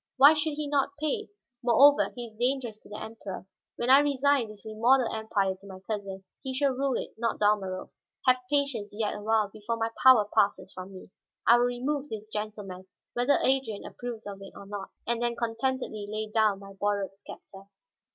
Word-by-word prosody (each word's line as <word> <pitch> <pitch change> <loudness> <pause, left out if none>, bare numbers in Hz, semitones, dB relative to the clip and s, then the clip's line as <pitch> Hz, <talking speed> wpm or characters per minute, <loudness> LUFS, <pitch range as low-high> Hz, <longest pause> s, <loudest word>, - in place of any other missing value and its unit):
"Why 280 +4 +9
should 310 0 -1
he 300 0 -3
not 285 0 0
pay? 360 +8 -1 0.3
Moreover, 275 +4 +5
he 245 -1 -5
is 225 - -12
dangerous 240 -1 -1
to - - -18
the 210 - -7
Emperor. 220 -4 -7 0.3
When 240 +2 +1
I 270 - +9
resign 280 -4 +2
this 210 -1 -13
remodeled 230 +3 +2
empire 215 -3 0
to 190 +1 -16
my 190 -1 -9
cousin, 195 -2 -5 0.2
he 260 -1 -4
shall 280 0 +2
rule 270 0 0
it, - - -5
not 230 -1 0
Dalmorov. 200 -3 0 0.3
Have 255 -1 +5
patience 275 -8 0
yet 215 -1 -1
a 210 - -7
while. 215 -1 +2
Before 215 +3 -4
my 225 0 -1
power 255 -6 +7
passes 200 -3 +1
from 185 +1 -8
me, 185 0 -12 0.3
I 235 - +7
will 245 - +3
remove 270 +4 -2
this 215 -1 -7
gentleman, 205 -3 -6 0.3
whether 245 +4 +3
Adrian 260 -6 +1
approves 240 -2 -7
of 200 -1 -7
it 195 - -10
or 200 - -10
not; 200 -1 -6 0.2
and 235 0 -1
then 240 0 0
contentedly 230 -2 -2
lay 215 +1 -2
down 215 -2 +3
my 195 0 -11
borrowed 200 0 -1
scepter." 195 -1 -12
225 Hz, 190 wpm, -28 LUFS, 205-260 Hz, 0.3 s, Why